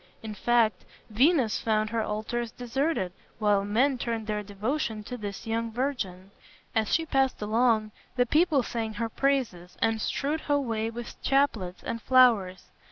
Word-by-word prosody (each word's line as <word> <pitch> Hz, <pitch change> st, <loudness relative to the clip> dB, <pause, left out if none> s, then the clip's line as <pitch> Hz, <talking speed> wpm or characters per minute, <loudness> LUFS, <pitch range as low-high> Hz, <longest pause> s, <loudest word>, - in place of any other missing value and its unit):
In 220 Hz, -1 st, -5 dB
fact 225 Hz, -3 st, +2 dB, 0.3 s
Venus 255 Hz, 0 st, +3 dB
found 215 Hz, -1 st, 0 dB
her 230 Hz, -1 st, 0 dB
altars 220 Hz, +3 st, -3 dB
deserted, 245 Hz, -, -1 dB, 0.3 s
while 205 Hz, -2 st, +2 dB
men 250 Hz, +6 st, +2 dB
turned 230 Hz, -2 st, -2 dB
their 210 Hz, -1 st, -2 dB
devotion 215 Hz, +3 st, -3 dB
to 250 Hz, -, -6 dB
this 205 Hz, -2 st, -6 dB
young 230 Hz, 0 st, -2 dB
virgin. 210 Hz, -7 st, -3 dB, 0.4 s
As 220 Hz, -2 st, 0 dB
she 325 Hz, -, +2 dB
passed 270 Hz, -4 st, +1 dB
along, 215 Hz, 0 st, +2 dB, 0.2 s
the 245 Hz, -1 st, +3 dB
people 300 Hz, 0 st, +3 dB
sang 225 Hz, -2 st, -3 dB
her 230 Hz, +2 st, -2 dB
praises, 225 Hz, -10 st, -1 dB
and 225 Hz, -1 st, +1 dB
strewed 300 Hz, +7 st, -1 dB
her 290 Hz, -1 st, +1 dB
way 225 Hz, -4 st, -2 dB
with 235 Hz, +1 st, -8 dB
chaplets 230 Hz, -10 st, +1 dB
and 230 Hz, 0 st, -4 dB
flowers. 230 Hz, -9 st, +4 dB
230 Hz, 155 wpm, -27 LUFS, 210-255 Hz, 0.4 s, flowers